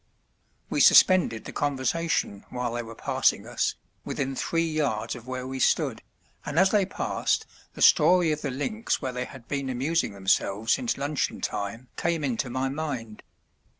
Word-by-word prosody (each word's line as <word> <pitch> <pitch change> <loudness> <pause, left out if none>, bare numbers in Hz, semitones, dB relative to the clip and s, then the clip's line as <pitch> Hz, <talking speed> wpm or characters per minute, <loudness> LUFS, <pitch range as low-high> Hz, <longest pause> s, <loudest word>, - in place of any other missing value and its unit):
We - - -2
suspended 175 - +6
the - - -6
conversation 145 -5 -1
while 125 -1 -3
they 120 - -2
were 115 0 -9
passing - - +1
us, - - -1 0.3
within 135 -1 -3
three 165 +5 0
yards 140 -9 -1
of 120 0 -11
where 130 0 -4
we 130 0 -5
stood, - - +1 0.4
and 150 +1 -5
as 190 +2 +5
they 205 -3 +3
passed - - -1 0.3
the - - 0
story 180 -3 +5
of 150 0 -2
the 145 - -2
links 215 - -2
where 130 -1 -4
they 125 0 -3
had 130 -3 -12
been 140 -2 -2
amusing 135 +1 0
themselves 100 +2 +1
since 125 -2 -1
luncheon 145 +1 -2
time 115 +5 -4
came 170 -2 0
into 130 -1 -1
my 130 +2 -1
mind. 135 -7 -5
135 Hz, 165 wpm, -26 LUFS, 120-155 Hz, 0.4 s, suspended